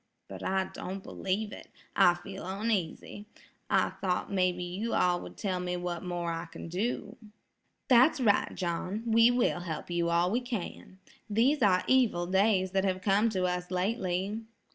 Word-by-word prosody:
But - - -9
I 190 0 +1
don't 190 +1 -6
believe 205 +3 -3
it. - - -10 0.3
I 175 - +6
feel 190 +2 -9
oneasy. 200 0 -3 0.4
I - - +2
thought 180 0 -1
maybe 185 -2 +1
you 190 +6 -3
all 175 -1 +2
would - - -10
tell 185 -3 -2 0.2
what 175 -1 -3
more 175 -2 -3
I 165 +1 -4
can 165 - -9
do." 205 +8 -3 0.7
"That's 260 +4 +5
right, 220 -5 +2
John. 180 +4 -3
We 230 +1 +5
will 245 -6 +1
help 170 -1 -5
you 170 -1 0
all 170 +2 +2
we 240 +3 +1
can. 230 -6 -6 0.3
These 250 +8 +2
are 185 -4 +4
evil 240 -10 +3
days 190 0 +2
that 190 0 +1
have 185 -1 0
come 205 +3 +3
to 190 -4 -1
us 180 0 -2
lately." 190 +2 -1
190 Hz, 165 wpm, -30 LUFS, 180-215 Hz, 0.7 s, I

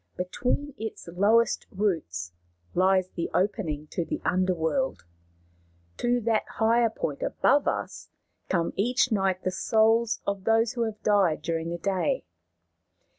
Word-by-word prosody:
" - - -39
Between 250 +10 -2
its 220 -4 -6
lowest 205 +7 +2
roots 160 - -2 0.4
lies 185 0 +3
the 170 - -4
opening 180 -6 -1
to 175 - -1
the - - -4
underworld. 185 - 0 0.9
To 245 0 +1
that 225 -1 +2
higher 230 +1 +3
point 150 -9 -4
above 285 +1 +2
us - - -3 0.4
come 170 -3 0
each 250 +4 +2
night 190 -3 +1
the 185 - 0
souls 225 +4 +2
of 200 -1 -2
those 225 0 +3
who 235 -2 0
have 220 -1 -6
died 200 -7 +2
during 165 0 -2
the 170 - -3
day. 185 -1 -1
200 Hz, 135 wpm, -27 LUFS, 175-225 Hz, 0.9 s, lies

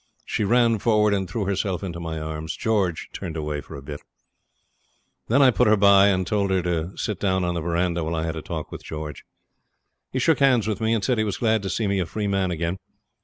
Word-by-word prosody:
She - - -1
ran 115 +1 +3
forward 105 -1 +3
and 95 -2 -1
threw 110 -4 -2
herself 95 -1 -1
into 85 -3 -5
my 80 -1 -4
arms. 80 +1 -5
George 100 -7 0
turned 85 -1 -5
away 75 -1 -3
for - - -11
a 70 - -9
bit. 70 0 -7 1.3
Then 140 +5 +4
I 130 - +7
put - - +2
her 105 0 +5
by, 100 0 +6
and 95 -2 +1
told 100 +1 0
her 95 -2 +1
to 85 +1 -2
sit 105 -4 -3
down 95 -2 +1
on 90 0 0
the 85 - -2
verandah 85 +1 0
while 80 +1 -2
I 80 0 -1
had 80 -1 -3
a 80 - -5
talk 80 -2 -6
with - - -8
George. 75 -1 -7 0.9
He - - -3
shook 155 +4 +3
hands 130 -6 +4
with 110 0 -2
me, 110 +1 +2
and 105 - -1
said 125 -4 +1
he - - +3
was 100 -3 -2
glad 110 -2 +2
to 95 - -4
see 110 - -1
me 100 -1 +1
a 90 - -1
free 105 +3 -3
man 95 -2 0
again. 85 +2 -2
95 Hz, 240 wpm, -24 LUFS, 85-110 Hz, 1.3 s, I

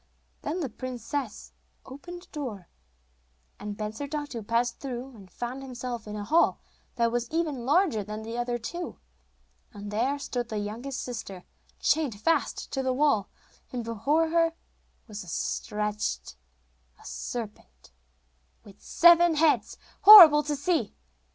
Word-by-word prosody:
Then 325 +5 -3
the 280 - -2
princess 250 0 -6 0.3
opened 350 +7 -10
a - - -19
door, 230 - -6 0.9
and 205 0 -6
Bensurdatu 275 +4 -5
passed 235 +3 -1
through, 260 -1 -6
and 195 -4 -14
found 245 +7 -6
himself 250 -3 -6
in 210 - -6
a 205 - -4
hall 315 +11 +2 0.4
that 235 -1 +1
was 240 0 -2
even 305 -7 -2
larger 295 - +2
than 215 +2 -7
the 225 +1 -6
other 240 0 -1
two. 345 +10 -6 0.7
And 205 -2 -8
there 250 +7 0
stood 245 -3 -4
the 215 - -3
youngest 230 +7 -4
sister, 200 -7 -7 0.4
chained 280 -10 +1
fast 330 +10 0
to 270 - -1
the 260 -1 0
wall, 260 -7 +2 0.4
and 245 -2 -4
before 275 +9 0
her 330 0 +2 0.5
was 210 -2 -7
stretched 210 - -3 0.6
a - - -18
serpent 210 - -7 0.7
with 200 0 -16
seven 345 -1 +5
heads, 310 0 +2 0.2
horrible 365 -8 +11
to 295 0 -2
see. 285 - -1
245 Hz, 135 wpm, -27 LUFS, 215-295 Hz, 0.9 s, horrible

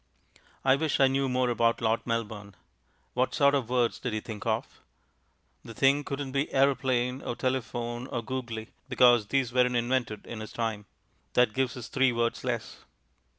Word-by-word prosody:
I 135 0 +5
wish 155 0 0
I 135 - +6
knew 135 0 0
more 125 -1 +1
about 115 0 +2
Lord 115 +1 0
Melbourne. 105 -3 -3 0.6
What 125 +1 0
sort 140 -1 +4
of 130 -5 0
words 125 -2 +1
did 125 - -3
he 110 - 0
think 110 0 -7
of? 110 0 +1 1.0
The 115 - -10
thing 140 +2 +3
couldn't 140 -1 -5
he 140 +1 0
"aeroplane" 130 -1 +1
or 120 - -4
"telephone" 120 -1 -3
or 120 -3 -4
"googly," 115 -2 -5 0.2
because 120 -4 +5
these 130 -2 0
weren't 125 -1 +3
invented 120 -3 -1
in 115 - -7
his 110 - -8
time. 110 -3 -3 0.5
That 125 -3 +3
gives 130 0 -1
us 120 -2 -7
three 135 -3 +2
words 115 0 -1
less. 120 -3 -3
125 Hz, 170 wpm, -28 LUFS, 115-130 Hz, 1.0 s, I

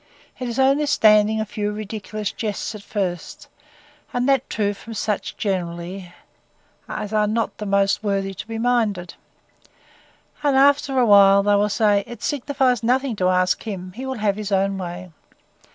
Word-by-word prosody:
It 250 - -3
is 235 - -5
only 275 +3 +3
standing 215 -4 +4
a 215 - -1
few 210 0 -3
ridiculous 210 -1 -5
jests 215 0 -4
at 215 - -9
first, 195 - -4 0.6
and 245 +1 -1
that 270 -2 +2
too 205 -2 0
from 225 +3 -10
such, 210 -1 -3
generally, 180 -1 -4 0.8
as 210 0 -5
are 210 -1 +2
not 225 +2 -2
the 210 - -4
most 200 +1 +1
worthy 195 -1 -1
to 190 - -8
be 225 0 -5
minded; 225 -7 0 1.3
and, 285 -3 +2
after 275 0 +3
a 250 - +4
while, 200 -2 +6
they 205 0 +3
will 205 +1 +2
say, 205 -1 +2
It 240 -3 -10
signifies 270 -4 0
nothing 255 +1 +1
to 185 -1 +2
ask 185 0 +1
him: 185 -4 -6
he 255 +7 -7
will 265 - -3
have 210 -3 0
his 210 -1 -5
own 195 0 +1
way. 180 0 -7
210 Hz, 170 wpm, -22 LUFS, 195-240 Hz, 1.3 s, while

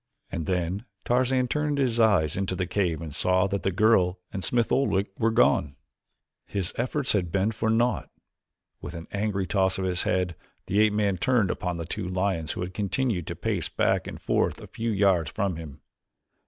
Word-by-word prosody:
And 80 -2 -3
then 90 +4 -1 0.2
Tarzan 125 +1 +2
turned 150 +2 0
his 125 -4 +1
eyes 95 -8 +4
into 95 -1 -1
the 90 - -1
cave 85 -4 -1
and 80 -3 -7
saw 90 +3 +3
that 100 0 -2
the 95 - 0
girl 95 -2 +3 0.2
and 95 - -4
Smith 120 -2 +1
Oldwick 100 -7 +2
were 115 - +3
gone. 110 - +3 0.7
His 95 -4 -2
efforts 140 +2 -1
had 90 -5 0
been 100 +4 +1
for 110 0 -1
naught. 120 +2 +1 0.7
With 85 - -7
an 85 0 -7
angry 100 -1 -1
toss 95 +2 +1
of 95 - -2
his 90 -2 0
head, 90 -2 0 0.3
the 100 - +1
ape 105 -1 +4
man 100 -3 +1
turned 110 -1 +2
upon 90 -1 -3
the 85 -1 -4
two 95 +3 -4
lions 90 -4 -1
who - - -5
had 90 +1 -4
continued 105 -1 -1
to - - -4
pace - - -2
back - - +1
and - - -7
forth - - 0
a - - -9
few 115 +1 -4
yards 95 -7 +2
from 95 -1 -2
him. 75 -3 -9
95 Hz, 195 wpm, -26 LUFS, 90-110 Hz, 0.7 s, eyes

